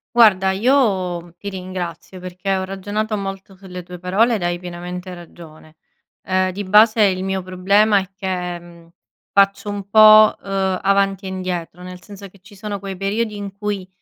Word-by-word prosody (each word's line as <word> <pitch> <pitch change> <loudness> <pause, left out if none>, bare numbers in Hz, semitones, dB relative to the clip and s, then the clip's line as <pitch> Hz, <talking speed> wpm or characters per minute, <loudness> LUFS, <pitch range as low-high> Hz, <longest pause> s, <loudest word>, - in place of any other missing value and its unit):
Guarda, 195 -5 +5
io 190 -7 0
ti 200 - -6
ringrazio 185 -1 -7
perché 185 +2 -3
ho 190 - -2
ragionato 205 +3 -3
molto 195 -1 -6
sulle 185 -1 -10
tue 180 0 -10
parole 215 +6 +2
ed 195 - -4
hai 175 0 -1
pienamente 180 +1 -7
ragione. 160 -2 -14 0.5
Ehm, 185 0 0
di 200 +3 -5
base 215 +3 +5
il 185 -2 +1
mio 190 -1 -2
problema 200 +3 +2
è 190 - -7
che, 180 -2 -4
mhmm, 170 -1 -17 0.4
faccio 200 +1 +2
un 200 -1 -5
po', 215 0 +7
ehm, 190 -1 -2
avanti 195 0 +1
e - - -4
indietro, 180 -2 -5
nel 180 0 -10
senso 200 0 -11
che 195 +1 -21
ci 205 +1 -17
sono 205 0 -6
quei 195 -1 -7
periodi 210 +2 -2
in 200 -1 -7
cui 200 -2 -4
190 Hz, 170 wpm, -19 LUFS, 180-200 Hz, 0.5 s, po